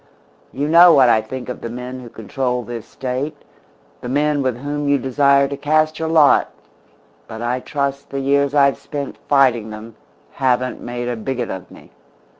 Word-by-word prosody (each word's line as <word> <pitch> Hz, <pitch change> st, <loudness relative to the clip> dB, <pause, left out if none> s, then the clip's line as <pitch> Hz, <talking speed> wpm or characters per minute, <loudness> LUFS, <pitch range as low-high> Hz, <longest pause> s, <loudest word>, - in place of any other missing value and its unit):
You 140 Hz, +2 st, -2 dB
know 170 Hz, +2 st, +8 dB
what 130 Hz, -5 st, +5 dB
I 110 Hz, -2 st, +4 dB
think 125 Hz, +4 st, -7 dB
of 125 Hz, -, -6 dB
the 115 Hz, -, -5 dB
men 125 Hz, +2 st, -7 dB
who 120 Hz, -2 st, -10 dB
control 125 Hz, +3 st, -3 dB
this 115 Hz, 0 st, -7 dB
State, 135 Hz, +4 st, -4 dB, 0.6 s
the 125 Hz, -, -6 dB
men 145 Hz, +2 st, +1 dB
with 130 Hz, -3 st, -1 dB
whom 145 Hz, +2 st, -3 dB
you 140 Hz, -, +4 dB
desire 140 Hz, +1 st, +3 dB
to 140 Hz, -, -5 dB
cast 155 Hz, +2 st, +1 dB
your 160 Hz, -, -2 dB
lot, 160 Hz, -3 st, +4 dB, 0.8 s
but 110 Hz, +1 st, -7 dB
I 125 Hz, +2 st, -1 dB
trust 140 Hz, +1 st, -3 dB
the 140 Hz, -, -4 dB
years 140 Hz, +1 st, +1 dB
I've 140 Hz, -1 st, +3 dB
spent 145 Hz, -2 st, -6 dB
fighting 125 Hz, -6 st, +3 dB
them 110 Hz, +1 st, -10 dB, 0.4 s
haven't 130 Hz, -1 st, -1 dB
made 120 Hz, 0 st, -5 dB
a 120 Hz, -, -2 dB
bigot 120 Hz, +2 st, -4 dB
of 95 Hz, -1 st, -7 dB
me. -, -, -16 dB
135 Hz, 180 wpm, -19 LUFS, 120-145 Hz, 0.8 s, know